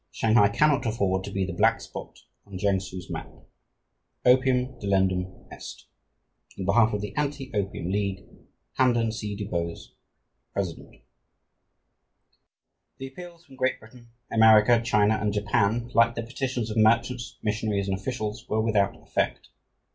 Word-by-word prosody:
Shanghai 110 -2 +3
cannot 145 +3 +2
afford 95 -4 0
to 100 - -7
be 95 -1 -1
the 95 - -5
black - - +3
spot - - -10 0.3
on 100 -2 -8
Kiangsu's 95 -2 -2
map. - - -6 0.9
Opium 125 0 +4
delendum 95 -2 0
est. - - -10 0.7
"In 95 - -4
behalf 110 +4 +4
of 105 - -2
the 105 - -6
Anti 145 -3 -3
Opium 95 -3 -2
League, 100 -1 -2 0.5
"HAMPDEN 120 -3 +3
C. 105 -2 -5
DUBOSE, 85 -5 -4 0.6
President." 90 -5 -5 2.0
The 135 - -7
appeals 175 +3 -12
from 135 - -16
Great 130 0 0
Britain, 120 +1 -16 0.2
America, 110 +1 +6
China, 110 -2 +2
and 105 -1 0
Japan, 105 +3 0
like 115 +1 +4
the 115 - -3
petitions 125 -2 -3
of 105 - -4
merchants, 115 +3 +2
missionaries, 105 -2 -1
and 95 - 0
officials, 105 +1 -5
were 110 - +1
without 105 -3 +1
effect. - - -2
110 Hz, 135 wpm, -26 LUFS, 100-120 Hz, 2.0 s, America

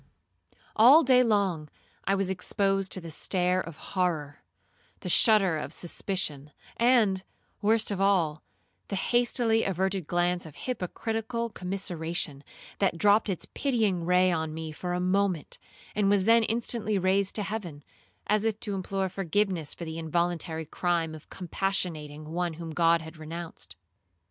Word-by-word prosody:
All 265 +9 +8
day 255 -1 +5
long 195 -10 +1 0.4
I 195 - +2
was 195 -1 0
exposed 195 +1 0
to 185 - -1
the 165 -1 -8
stare 180 +3 +1
of 165 -3 -9 0.2
horror, 160 -6 -1 0.6
the 180 - -4
shudder 195 -4 +5
of - - -5
suspicion, 165 -5 -3 0.3
and, 230 -6 +3 0.4
worst 220 +1 +2
of 195 -1 -2
all, 170 -6 +2 0.5
the 200 - -3
hastily 235 +1 +2
averted 190 -2 -1
glance 175 0 +1
of 150 - -13
hypocritical 230 +1 -3
commiseration, 175 -6 -4 0.4
that 195 -4 +1
dropt 205 +3 +4
its 185 - -2
pitying 220 -10 0
ray 180 +1 +4
on 160 -2 -2
me 160 -1 -5
for 175 +3 -4
a 180 - -1
moment, 185 -2 0 0.3
and 205 -1 +2
was 200 -1 +3
then 230 +1 +6
instantly 220 -2 -1
raised 190 +1 +1
to 210 - -1
heaven, 190 -8 -5 0.4
as 210 0 +1
if 220 -1 -1
to 205 - -3
implore 195 0 -2
forgiveness 190 -3 -1
for 170 - -7
the 160 0 -5
involuntary 165 0 -1
crime 170 0 -1
of 155 - -12
compassionating 170 -5 -3
one 175 -1 -2
whom 165 0 -7
God 165 +1 +3
had 160 +1 -11
renounced. 165 +2 -7
185 Hz, 145 wpm, -28 LUFS, 165-205 Hz, 0.6 s, All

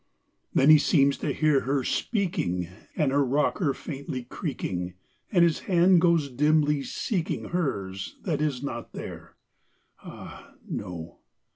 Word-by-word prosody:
Then 140 +3 +5
he 155 - +9
seems 140 -3 +3
to - - -1
hear 155 -3 +3
her 135 0 -1
speaking, 165 - -1 0.3
And 145 -4 +1
her 140 +1 +3
rocker 145 +4 +1
faintly 135 -3 -6
creaking, 95 - -4 0.4
And 175 -5 +5
his 170 -2 +3
hand 180 -1 +5
goes 170 -4 +3
dimly 150 +2 +2
seeking 175 - -3
Hers 100 - -3
that 155 -5 -1
is 140 -4 -1
not 120 -4 -5
there, - - -8 0.7
ah, - - -11
no! 85 -2 -6
145 Hz, 130 wpm, -27 LUFS, 125-165 Hz, 0.7 s, he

